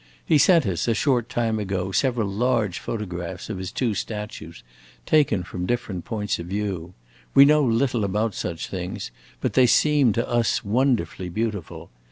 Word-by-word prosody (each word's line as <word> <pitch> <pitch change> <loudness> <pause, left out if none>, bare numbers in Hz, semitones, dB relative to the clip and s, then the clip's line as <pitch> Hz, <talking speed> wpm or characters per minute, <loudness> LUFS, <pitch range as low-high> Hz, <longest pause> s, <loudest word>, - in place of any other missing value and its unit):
He 155 - +4
sent 165 -1 +5
us, 90 -1 -1
a 115 - +2
short 120 -1 +1
time 115 -2 0
ago, 95 -2 -2
several 120 -1 +1
large 105 -2 0
photographs 90 -3 -5
of 95 - -5
his 95 -1 -5
two 120 -5 -1
statues, 100 - -6 0.4
taken 145 -12 +3
from 90 +1 -5
different 120 -8 -3
points 105 -4 -2
of 85 - -6
view. 95 -3 -4 0.4
We 140 - +9
know 150 +1 +5
little 120 -1 +1
about 105 +2 0
such 85 -2 -4
things, 90 -1 -5 0.3
but - - -1
they 130 -1 +5
seem 145 -1 +4
to 115 +3 -1
us 120 0 0
wonderfully 115 -5 0
beautiful. 105 - -4
105 Hz, 165 wpm, -24 LUFS, 95-120 Hz, 0.4 s, We